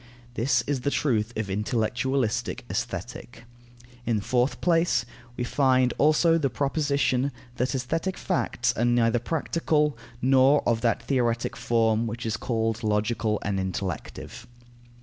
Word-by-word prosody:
This 120 Hz, 0 st, +1 dB
is 140 Hz, -3 st, -2 dB
the 140 Hz, -, 0 dB
truth 120 Hz, -7 st, 0 dB
of 110 Hz, -2 st, -2 dB
intellectualistic 120 Hz, +3 st, -1 dB
Aesthetic. 120 Hz, -1 st, -5 dB, 0.6 s
In 120 Hz, -1 st, 0 dB
the 105 Hz, -, -1 dB
fourth 125 Hz, +3 st, +1 dB
place, 170 Hz, -1 st, +2 dB, 0.3 s
we 125 Hz, -, -1 dB
find 130 Hz, -1 st, +2 dB
also 165 Hz, +3 st, +4 dB
the 140 Hz, -3 st, +1 dB
proposition; 140 Hz, 0 st, 0 dB, 0.3 s
that 125 Hz, +3 st, 0 dB
aesthetic 165 Hz, +9 st, -2 dB
facts 120 Hz, -9 st, 0 dB
are 120 Hz, -, 0 dB
neither 120 Hz, -1 st, +3 dB
practical, 150 Hz, +1 st, 0 dB, 0.2 s
nor 135 Hz, +3 st, +4 dB
of 115 Hz, -1 st, +1 dB
that 115 Hz, -1 st, +1 dB
theoretic 120 Hz, -4 st, 0 dB
form 115 Hz, -1 st, +1 dB
which 115 Hz, +1 st, -5 dB
is 110 Hz, -2 st, -1 dB
called 115 Hz, 0 st, -1 dB
logical 105 Hz, +1 st, 0 dB
and 100 Hz, -1 st, -1 dB
intellective. 95 Hz, +5 st, -5 dB
120 Hz, 130 wpm, -26 LUFS, 115-140 Hz, 0.6 s, also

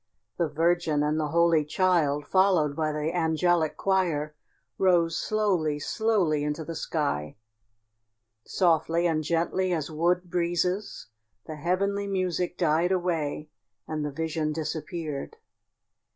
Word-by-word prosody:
The 170 Hz, -, +2 dB
Virgin 160 Hz, -1 st, +1 dB
and 150 Hz, +1 st, 0 dB
the 155 Hz, -, 0 dB
Holy 170 Hz, 0 st, +3 dB
Child, 150 Hz, -3 st, +1 dB
followed 180 Hz, -5 st, +3 dB
by 155 Hz, 0 st, 0 dB
the 150 Hz, +3 st, -2 dB
angelic 165 Hz, -1 st, +1 dB
choir, 170 Hz, -6 st, 0 dB, 0.5 s
rose 170 Hz, -3 st, +3 dB
slowly, 185 Hz, -9 st, 0 dB
slowly 180 Hz, -3 st, 0 dB
into 150 Hz, +1 st, -3 dB
the 165 Hz, -, -5 dB
sky. 145 Hz, -, -2 dB, 1.1 s
Softly 165 Hz, 0 st, +1 dB
and 160 Hz, -2 st, +1 dB
gently 170 Hz, +4 st, 0 dB
as 160 Hz, -2 st, -3 dB
wood 175 Hz, +3 st, +1 dB
breezes 180 Hz, +3 st, -1 dB, 0.4 s
the 155 Hz, -, -7 dB
heavenly 200 Hz, +5 st, -1 dB
music 185 Hz, -2 st, -1 dB
died 165 Hz, +4 st, +2 dB
away 165 Hz, -5 st, -1 dB, 0.4 s
and 155 Hz, -1 st, -3 dB
the 150 Hz, -, -2 dB
vision 160 Hz, 0 st, -2 dB
disappeared. 155 Hz, -1 st, -5 dB
165 Hz, 120 wpm, -27 LUFS, 155-180 Hz, 1.1 s, Holy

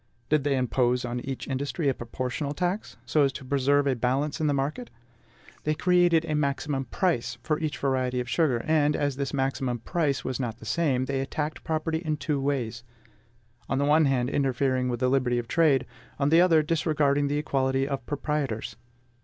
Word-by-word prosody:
Did 155 Hz, -2 st, +3 dB
they 140 Hz, -1 st, +1 dB
impose 125 Hz, 0 st, +1 dB
on 120 Hz, 0 st, -3 dB
each 135 Hz, +1 st, -5 dB
industry 140 Hz, +3 st, -2 dB
a 135 Hz, -, +3 dB
proportional 130 Hz, +4 st, -4 dB
tax, 180 Hz, +5 st, -2 dB
so 155 Hz, -, +2 dB
as 140 Hz, -1 st, +3 dB
to 130 Hz, -, -8 dB
preserve 140 Hz, +1 st, +2 dB
a 135 Hz, -2 st, +2 dB
balance 130 Hz, +6 st, -1 dB
in 155 Hz, -, +2 dB
the -, -, +3 dB
market? 145 Hz, -, -2 dB, 0.7 s
They 155 Hz, 0 st, 0 dB
created 175 Hz, -1 st, +3 dB
a 155 Hz, -, -2 dB
maximum 140 Hz, -1 st, -1 dB
PRICE 120 Hz, -5 st, -1 dB
for 155 Hz, +2 st, 0 dB
each 155 Hz, -2 st, -2 dB
variety 130 Hz, -2 st, 0 dB
of 125 Hz, -, -3 dB
sugar; 130 Hz, -4 st, +1 dB
and, 150 Hz, -1 st, +3 dB
as 145 Hz, -2 st, 0 dB
this 140 Hz, 0 st, -3 dB
maximum 135 Hz, -2 st, -1 dB
PRICE 145 Hz, +3 st, -1 dB
was 130 Hz, -1 st, -2 dB
not 115 Hz, -4 st, -3 dB
the -, -, -13 dB
same, 140 Hz, -7 st, +1 dB
they 135 Hz, 0 st, -1 dB
attacked 150 Hz, +3 st, -4 dB
property 160 Hz, 0 st, -1 dB
in 155 Hz, -3 st, -2 dB
two 145 Hz, -2 st, -1 dB
ways, 120 Hz, -5 st, -2 dB, 0.9 s
on 135 Hz, -, 0 dB
the 140 Hz, -, +1 dB
one 155 Hz, +2 st, +4 dB
hand, 130 Hz, -2 st, +1 dB
interfering 130 Hz, -1 st, +1 dB
with 120 Hz, 0 st, -3 dB
the 130 Hz, -, +3 dB
liberty 125 Hz, -2 st, +2 dB
of 120 Hz, -1 st, -3 dB
trade; 145 Hz, -5 st, +3 dB, 0.3 s
on 140 Hz, 0 st, +1 dB
the 165 Hz, +2 st, +6 dB
other, 165 Hz, -4 st, +5 dB
disregarding 150 Hz, -3 st, +1 dB
the 145 Hz, +1 st, 0 dB
equality 135 Hz, -2 st, 0 dB
of 135 Hz, -2 st, -3 dB
proprietors. 145 Hz, -6 st, -2 dB
140 Hz, 190 wpm, -27 LUFS, 130-155 Hz, 0.9 s, the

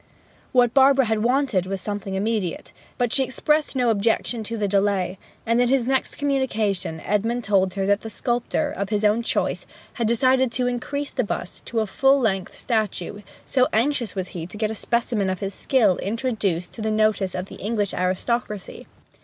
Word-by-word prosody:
What 245 Hz, -2 st, +4 dB
Barbara 270 Hz, -1 st, +5 dB
had 220 Hz, -1 st, 0 dB
wanted 245 Hz, -6 st, +1 dB
was 195 Hz, 0 st, -3 dB
something 205 Hz, -1 st, -4 dB
immediate; 205 Hz, -3 st, -2 dB, 0.2 s
but 245 Hz, -1 st, 0 dB
she 270 Hz, -, +3 dB
expressed 300 Hz, +3 st, 0 dB
no 245 Hz, -3 st, +3 dB
objection 225 Hz, +2 st, 0 dB
to 230 Hz, +2 st, -3 dB
the 210 Hz, -1 st, 0 dB
delay; 195 Hz, -2 st, +1 dB, 0.3 s
and 230 Hz, +2 st, +3 dB
in 245 Hz, -, +3 dB
his 265 Hz, -2 st, +2 dB
next 265 Hz, +1 st, 0 dB
communication 220 Hz, -, 0 dB
Edmund 225 Hz, +4 st, 0 dB
told 190 Hz, -2 st, +2 dB
her 195 Hz, -1 st, 0 dB
that 200 Hz, +1 st, +2 dB
the 225 Hz, -, -6 dB
sculptor, 245 Hz, +6 st, -1 dB
of 200 Hz, -7 st, -3 dB
his 210 Hz, 0 st, 0 dB
own 210 Hz, +3 st, +3 dB
choice, 235 Hz, -, -1 dB, 0.3 s
had 230 Hz, -, +2 dB
decided 255 Hz, +2 st, +3 dB
to 250 Hz, +1 st, 0 dB
increase 280 Hz, +4 st, -2 dB
the 255 Hz, -, 0 dB
bust 190 Hz, -3 st, -5 dB
to 230 Hz, -1 st, 0 dB
a -, -, 0 dB
full 270 Hz, +6 st, +3 dB
length 195 Hz, -6 st, -1 dB
statue, 210 Hz, -3 st, -2 dB, 0.2 s
so 255 Hz, -1 st, +3 dB
anxious 235 Hz, -2 st, +1 dB
was 185 Hz, -1 st, -3 dB
he 165 Hz, -2 st, -6 dB
to 195 Hz, -, -10 dB
get 215 Hz, 0 st, 0 dB
a -, -, -2 dB
specimen 225 Hz, -2 st, 0 dB
of 185 Hz, -1 st, -2 dB
his 195 Hz, 0 st, -3 dB
skill 230 Hz, -8 st, +2 dB
introduced 205 Hz, -6 st, -2 dB
to 225 Hz, -, -8 dB
the 220 Hz, -, 0 dB
notice 215 Hz, -3 st, +1 dB
of 180 Hz, 0 st, -3 dB
the -, -, -11 dB
English 210 Hz, -1 st, -1 dB
aristocracy. 200 Hz, +3 st, -2 dB
220 Hz, 185 wpm, -23 LUFS, 195-245 Hz, 0.3 s, Barbara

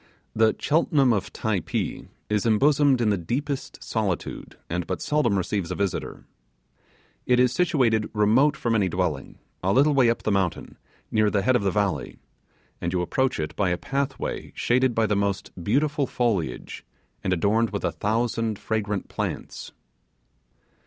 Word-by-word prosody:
The 110 Hz, 0 st, +3 dB
Cheltenham 145 Hz, -4 st, +3 dB
of 100 Hz, -4 st, -2 dB
Typee 105 Hz, -7 st, -2 dB, 0.2 s
is 105 Hz, -1 st, 0 dB
embosomed 135 Hz, +3 st, +4 dB
in 110 Hz, -2 st, +3 dB
the 100 Hz, -, 0 dB
deepest 135 Hz, -, -4 dB
solitude, 100 Hz, -6 st, -3 dB
and 85 Hz, -1 st, -3 dB
but 95 Hz, -, -2 dB
seldom 145 Hz, -9 st, +1 dB
receives 95 Hz, -1 st, -2 dB
a 90 Hz, -, -3 dB
visitor. 100 Hz, -3 st, -3 dB, 1.0 s
It 125 Hz, 0 st, +4 dB
is 125 Hz, 0 st, +4 dB
situated 125 Hz, -11 st, +2 dB
remote 115 Hz, +8 st, +3 dB
from 120 Hz, -, -1 dB
any 100 Hz, -4 st, +2 dB
dwelling, 85 Hz, -6 st, -2 dB, 0.2 s
a 95 Hz, -, +1 dB
little 145 Hz, +6 st, +4 dB
way 130 Hz, -4 st, +4 dB
up 115 Hz, -, -1 dB
the 110 Hz, -, 0 dB
mountain, 95 Hz, -4 st, -1 dB, 0.3 s
near 110 Hz, -1 st, +3 dB
the 100 Hz, -2 st, 0 dB
head 130 Hz, +4 st, +3 dB
of 125 Hz, -, +2 dB
the 100 Hz, -, +1 dB
valley; 100 Hz, -1 st, -1 dB, 0.6 s
and 85 Hz, -, -1 dB
you 90 Hz, -1 st, 0 dB
approach 130 Hz, +6 st, 0 dB
it 75 Hz, -1 st, -3 dB
by 100 Hz, -3 st, +1 dB
a 90 Hz, -, 0 dB
pathway 135 Hz, +5 st, -3 dB
shaded 125 Hz, 0 st, +2 dB
by 115 Hz, -, +3 dB
the 105 Hz, -, +1 dB
most 100 Hz, -1 st, -1 dB
beautiful 140 Hz, -, +1 dB
foliage, 100 Hz, -, -2 dB, 0.4 s
and 95 Hz, -, -1 dB
adorned 105 Hz, +6 st, +2 dB
with 100 Hz, -, -3 dB
a -, -, +1 dB
thousand 115 Hz, 0 st, -1 dB
fragrant 105 Hz, -3 st, -2 dB
plants. -, -, -5 dB
110 Hz, 160 wpm, -25 LUFS, 100-130 Hz, 1.0 s, embosomed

